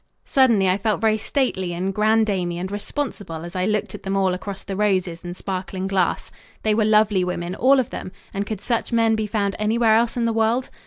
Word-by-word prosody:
Suddenly 235 -8 +4
I 185 +2 +2
felt 215 +1 0
very 220 -1 +2
stately 200 -8 -1
and 185 +3 -2
granddamey 210 -5 +1
and 185 +2 -4
responsible 205 - -4
as 175 +2 -9
I 185 0 0
looked 210 -1 -1
at - - -8
them 195 0 -2
all 190 -2 +2
across 195 +1 -6
the 195 - -5
roses 185 -4 0
and 175 0 -7
sparkling 185 -1 -4
glass. 190 -2 0 0.3
They 215 - +2
were 215 0 +2
lovely 210 -3 +3
women, 180 0 -3
all 265 +7 +4
of 250 - -1
them, 185 - -6 0.2
and 200 - -1
could 215 -3 -4
such 235 -1 -1
men 225 -1 +3
be 220 -1 -2
found 200 -1 -1
anywhere 220 +1 +3
else 235 +2 +1
in 235 - +1
the 230 - +1
world? 225 +3 +1
205 Hz, 215 wpm, -22 LUFS, 185-220 Hz, 0.3 s, Suddenly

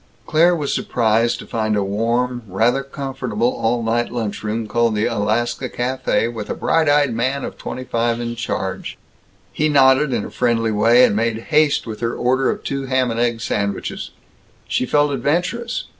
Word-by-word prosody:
Claire 170 +6 +4
was 145 -4 -2
surprised 115 0 +1
to - - -9
find 110 -2 -1
a 100 - +1
warm, 120 +5 -1
rather 115 +8 +1
comfortable 130 -4 -2
all 115 +1 0
night 115 +1 0
lunch 110 -4 -3
room, 110 +1 -2
called 115 0 +1
the 105 +1 +1
Alaska 120 +3 -1
Café, 125 -2 -1
with 110 -2 -6
a - - -2
bright 160 -2 +1
eyed 145 -3 +3
man 130 +5 -1
of - - -7
twenty 130 - -6
five 115 -1 -1
in 120 0 -4
charge. 120 0 -4 0.6
He 155 +1 +1
nodded 135 0 +4
in 115 -4 -1
a - - -8
friendly 115 -2 +1
way, 115 +4 +5
and - - 0
made 115 +1 0 0.2
haste 150 -1 +3
with 110 -2 -6
her 115 0 -2
order 130 +2 +1
of - - -3
two 135 -1 -3
ham 130 -2 +1
and 115 - -3
egg 120 -1 0
sandwiches. 100 -2 -3 0.6
She 130 - -1
felt 145 +1 +2
adventurous. 180 - -1
120 Hz, 180 wpm, -20 LUFS, 115-135 Hz, 0.6 s, way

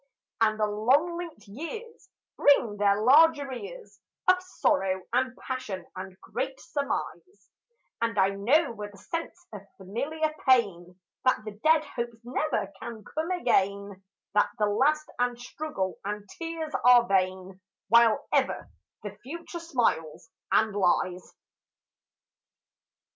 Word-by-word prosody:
And 215 -1 +3
the 215 - +3
long 255 +12 +2
linked 330 -11 -8
years 380 - -8 0.3
Bring 240 -7 +4
their 200 0 +3
large 310 +7 +7
arrears 405 - -8 0.3
Of 365 0 +5
sorrow 195 - 0
and 255 +1 +1
passion 255 -8 -5
and 185 0 -8
great 265 +6 -4
surmise, 205 - -5 0.5
And 230 -1 0
I 190 0 +4
know 235 +11 +2
with 210 -2 -8
a - - -15
sense 335 - -6
of 205 - -7 0.2
familiar 280 +11 -2 0.2
pain 185 -8 +2 0.2
That 255 -4 +2
the 215 - -5
dead 310 +9 +2
hopes 235 -1 -5
never 245 -5 -2
can 230 -2 -7
come 315 - -4
again, 200 - 0 0.3
That 210 - +3
the 210 - +2
lust 280 +9 +2
and 245 -1 0
struggle 245 -7 -4
and 205 +1 -5
tears 330 -2 -4
are 245 -1 +7
vain, 185 -1 -1 0.3
While 230 0 +5
ever - - 0 0.3
the 205 -1 -8
future 335 +5 -7
smiles 195 - -1 0.2
and 215 -2 +3
lies. 180 -1 0
235 Hz, 125 wpm, -27 LUFS, 200-305 Hz, 0.5 s, large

